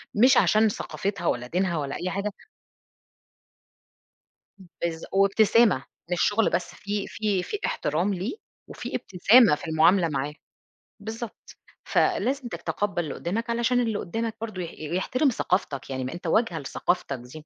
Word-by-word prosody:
مش 250 Hz, +5 st, +6 dB
عشان 215 Hz, +1 st, +4 dB
ثقافتها 195 Hz, -3 st, -3 dB
ولا 125 Hz, 0 st, 0 dB
دينها 175 Hz, +2 st, 0 dB
ولا 140 Hz, -2 st, -3 dB
أي 185 Hz, -, -3 dB
حاجة 200 Hz, +2 st, -2 dB, 2.3 s
بالض 170 Hz, -2 st, -5 dB
وابتسامة، 200 Hz, -, +4 dB, 0.3 s
مش 175 Hz, -, +1 dB
شغل 210 Hz, +1 st, +3 dB
بس، 180 Hz, -, -2 dB
في 205 Hz, +1 st, -3 dB
في 205 Hz, -4 st, -1 dB
في 420 Hz, -, -4 dB
إحترام 175 Hz, +7 st, 0 dB
ليه، 190 Hz, -, -3 dB, 0.3 s
وفي -, -, -6 dB
إبتسامة 200 Hz, 0 st, +5 dB
في -, -, -9 dB
المعاملة 170 Hz, +3 st, +4 dB
معاه. 140 Hz, +1 st, -2 dB, 0.7 s
بالضبط. 220 Hz, +2 st, -7 dB, 0.3 s
فلازم 280 Hz, -8 st, +1 dB
تتقبَّل 205 Hz, -5 st, -2 dB
اللي 150 Hz, -, -5 dB
قدّامك، 230 Hz, +7 st, -3 dB
علشان 235 Hz, +1 st, +2 dB
اللي 225 Hz, -3 st, 0 dB
قدّامك 225 Hz, +4 st, -3 dB
برضه 215 Hz, -5 st, -4 dB
يح 170 Hz, -, -5 dB
يحترم 185 Hz, -, 0 dB
ثقافتك، 165 Hz, -, -1 dB
يعني 130 Hz, -1 st, -3 dB
ما 130 Hz, -, -4 dB
أنت 175 Hz, -, -7 dB
واجهة 195 Hz, -1 st, +2 dB
لثقافتك 140 Hz, -1 st, -2 dB
دي. 125 Hz, +1 st, -13 dB
195 Hz, 140 wpm, -26 LUFS, 170-225 Hz, 2.3 s, مش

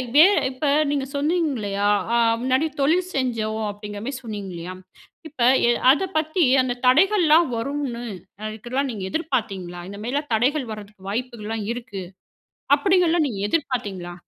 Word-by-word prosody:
வே 305 Hz, +3 st, +9 dB, 0.3 s
இப்ப 260 Hz, +4 st, -4 dB, 0.3 s
நீங்க 280 Hz, -2 st, -1 dB
சொன்னீங்கல்லயா, 280 Hz, -, 0 dB, 0.3 s
ஆ -, -, +3 dB, 0.3 s
முன்னாடி 260 Hz, +4 st, +2 dB
தொழில் 345 Hz, +6 st, +2 dB
செஞ்சோம் 220 Hz, -4 st, -1 dB
அப்பிடிங்கிறமாரி 205 Hz, +4 st, -6 dB
சொன்னீங்க 205 Hz, -4 st, -6 dB
இல்லயா, 175 Hz, +2 st, -6 dB, 0.5 s
இப்ப 285 Hz, -4 st, -9 dB, 0.3 s
எ -, -, +4 dB, 0.2 s
அத 290 Hz, +7 st, +2 dB
பத்தி 315 Hz, +3 st, +1 dB, 0.2 s
அந்த 250 Hz, -1 st, -1 dB
தடைகள்லாம் 335 Hz, +2 st, +5 dB
வரும்னு 255 Hz, -1 st, -3 dB, 0.4 s
அதுக்குல்லாம் 240 Hz, +6 st, -3 dB
நீங்க 205 Hz, -4 st, -6 dB
எதிர்பார்த்தீங்களா? 200 Hz, -, -3 dB
இந்தமாரிலாம் 240 Hz, +8 st, -4 dB
தடைகள் 255 Hz, +2 st, +1 dB
வரதுக்கு 205 Hz, -2 st, -11 dB
வாய்ப்புகள்லாம் 225 Hz, -2 st, -4 dB
இருக்கு. 235 Hz, -5 st, -7 dB, 0.7 s
அப்பிடிங்கல்லாம் 355 Hz, -4 st, +3 dB
நீங்க 205 Hz, -7 st, -4 dB
எதிர்பார்த்தீங்களா? 205 Hz, -, -2 dB
250 Hz, 120 wpm, -23 LUFS, 210-295 Hz, 0.7 s, வே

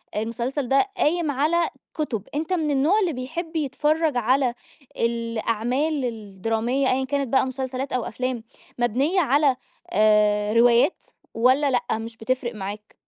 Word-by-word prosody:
المسلسل 235 Hz, +5 st, -2 dB
ده 275 Hz, +9 st, +4 dB
قايم 320 Hz, 0 st, +1 dB
على 315 Hz, +5 st, +1 dB, 0.2 s
كُتُب، 235 Hz, -10 st, -3 dB
أنت 320 Hz, +5 st, -1 dB
من 315 Hz, -4 st, 0 dB
النوع 305 Hz, +10 st, +3 dB
اللي 360 Hz, -6 st, 0 dB
بيحب 320 Hz, +7 st, -5 dB
يتفرّج 305 Hz, 0 st, +1 dB
على 250 Hz, +1 st, +2 dB, 0.4 s
الأعمال 235 Hz, +5 st, -1 dB
الدرامية 225 Hz, +4 st, -1 dB
أيًا 265 Hz, +1 st, +1 dB
كانت 280 Hz, 0 st, -1 dB
بقى 260 Hz, +2 st, +3 dB
مسلسلات 260 Hz, +1 st, -4 dB
أو 250 Hz, -2 st, 0 dB
أفلام 250 Hz, 0 st, -3 dB, 0.4 s
مبنية 265 Hz, -, +1 dB
على 285 Hz, -1 st, +3 dB, 0.4 s
آآ، 210 Hz, 0 st, +3 dB
روايات 240 Hz, +6 st, +4 dB, 0.3 s
والَّا 260 Hz, +5 st, +3 dB
لأ؟ 245 Hz, -, +1 dB
مش 225 Hz, 0 st, -8 dB
بتفرِق 245 Hz, +1 st, -2 dB
معاك؟ 205 Hz, +1 st, -7 dB
255 Hz, 135 wpm, -24 LUFS, 230-290 Hz, 0.4 s, ده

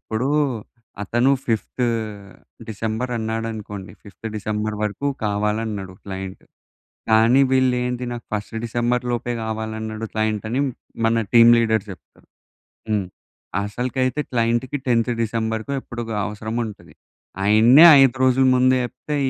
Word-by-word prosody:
ఇప్పుడు, 115 Hz, +5 st, -3 dB, 0.8 s
అతను 120 Hz, +5 st, +2 dB
fifth 120 Hz, +2 st, -1 dB, 0.8 s
December 110 Hz, +3 st, -3 dB
అన్నాడనుకోండి! 110 Hz, -3 st, -5 dB
Fifth 105 Hz, +2 st, -8 dB
December 105 Hz, 0 st, -3 dB
వరకు 105 Hz, +7 st, -2 dB, 0.2 s
కావాలన్నడు 105 Hz, -2 st, -2 dB
క్లయింట్. 95 Hz, -1 st, -7 dB, 0.7 s
కానీ 115 Hz, +5 st, +5 dB
వీళ్ళు 130 Hz, -1 st, +3 dB
ఏంది, 125 Hz, 0 st, -3 dB
"నాకు 120 Hz, -, -7 dB
ఫస్ట్ 105 Hz, +1 st, -4 dB
డిసెంబర్‌లోపే 120 Hz, +1 st, -1 dB
గావాలన్నడు 110 Hz, 0 st, -4 dB
క్లయింట్" 110 Hz, -1 st, -1 dB
అని 125 Hz, +4 st, 0 dB, 0.4 s
మన 115 Hz, 0 st, +3 dB
టీమ్ 115 Hz, -1 st, +8 dB
లీడర్స్ 110 Hz, -2 st, +1 dB
జెప్తారు. 90 Hz, -, -14 dB, 0.6 s
హ్మ్. 105 Hz, -2 st, +1 dB, 0.6 s
అసలుకైతే 130 Hz, +5 st, -2 dB
క్లయింట్‌కి 120 Hz, +3 st, 0 dB
10థ్ 120 Hz, 0 st, +2 dB
డిసెంబర్‌కో 110 Hz, +2 st, -2 dB
ఎప్పడుకో 120 Hz, -2 st, -6 dB
అవసరం 110 Hz, +3 st, -5 dB
ఉంటది. 105 Hz, -2 st, -11 dB, 0.5 s
ఆయననే 115 Hz, +8 st, +7 dB, 0.2 s
5 135 Hz, -2 st, +4 dB
రోజుల 130 Hz, +1 st, +4 dB
ముందు 130 Hz, +1 st, +4 dB
చెప్తే, 145 Hz, +4 st, -5 dB
115 Hz, 110 wpm, -22 LUFS, 110-125 Hz, 0.8 s, టీమ్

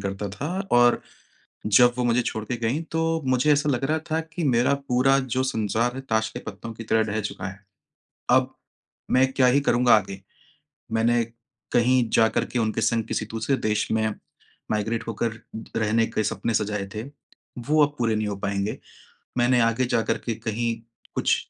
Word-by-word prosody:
करता 100 Hz, +1 st, -4 dB
था 120 Hz, +10 st, -5 dB, 0.2 s
और 120 Hz, 0 st, +5 dB, 0.7 s
जब 120 Hz, +4 st, +6 dB
वो 125 Hz, -, +1 dB
मुझे 120 Hz, +1 st, +2 dB
छोड़ 110 Hz, -1 st, -3 dB
के 120 Hz, +3 st, -3 dB
गईं 120 Hz, +7 st, -1 dB
तो, 165 Hz, 0 st, -1 dB
मुझे 130 Hz, +3 st, +3 dB
ऐसा 145 Hz, +1 st, +2 dB
लग 135 Hz, -1 st, 0 dB
रहा 155 Hz, +3 st, +1 dB
था 160 Hz, -, +1 dB
कि 160 Hz, +1 st, -5 dB
मेरा 125 Hz, 0 st, +3 dB
पूरा 135 Hz, +2 st, +4 dB
जो 130 Hz, -1 st, -1 dB
संसार 115 Hz, -1 st, 0 dB
है, 135 Hz, -, -5 dB
ताश 110 Hz, -4 st, 0 dB
के -, -, -7 dB
पत्तों 105 Hz, +2 st, -7 dB
की 115 Hz, 0 st, -9 dB
तरह 110 Hz, +1 st, +2 dB
ढह 110 Hz, -, 0 dB
चुका 105 Hz, -, -5 dB
है, 100 Hz, 0 st, -8 dB, 0.7 s
अब -, -, +3 dB, 0.6 s
मैं 130 Hz, +1 st, +3 dB
क्या 130 Hz, -1 st, +3 dB
ही 135 Hz, +3 st, +4 dB
करूँगा 125 Hz, -2 st, +4 dB
आगे, 95 Hz, -2 st, -3 dB, 0.7 s
मैंने 115 Hz, +1 st, +2 dB, 0.5 s
कहीं 120 Hz, -1 st, +3 dB
जाकर 110 Hz, -1 st, +3 dB
के 125 Hz, -, -3 dB
उनके 110 Hz, -1 st, 0 dB
संग 115 Hz, -1 st, +1 dB
किसी 110 Hz, -, -2 dB
दूसरे 115 Hz, +5 st, 0 dB
देश 105 Hz, -2 st, 0 dB
में 110 Hz, 0 st, +2 dB, 0.6 s
माइग्रेट 110 Hz, +2 st, -1 dB
होकर 115 Hz, 0 st, -2 dB, 0.4 s
रहने 115 Hz, +1 st, +2 dB
के 110 Hz, -1 st, -1 dB
सपने 115 Hz, +2 st, -2 dB
सजाए 105 Hz, -2 st, -1 dB
थे, 110 Hz, -, -3 dB, 0.6 s
वो 150 Hz, +5 st, +3 dB
अब 145 Hz, -, -9 dB
पूरे 115 Hz, -2 st, +1 dB
नहीं 110 Hz, 0 st, -1 dB
हो 100 Hz, -, -2 dB
पाएँगे। 100 Hz, +1 st, -2 dB, 0.6 s
मैंने 120 Hz, 0 st, +4 dB
आगे 115 Hz, +2 st, +2 dB
जाकर 115 Hz, -2 st, 0 dB
के 115 Hz, -, 0 dB
कहीं 115 Hz, +2 st, -2 dB, 0.4 s
कुछ -, -, +2 dB
115 Hz, 180 wpm, -24 LUFS, 110-130 Hz, 0.7 s, जब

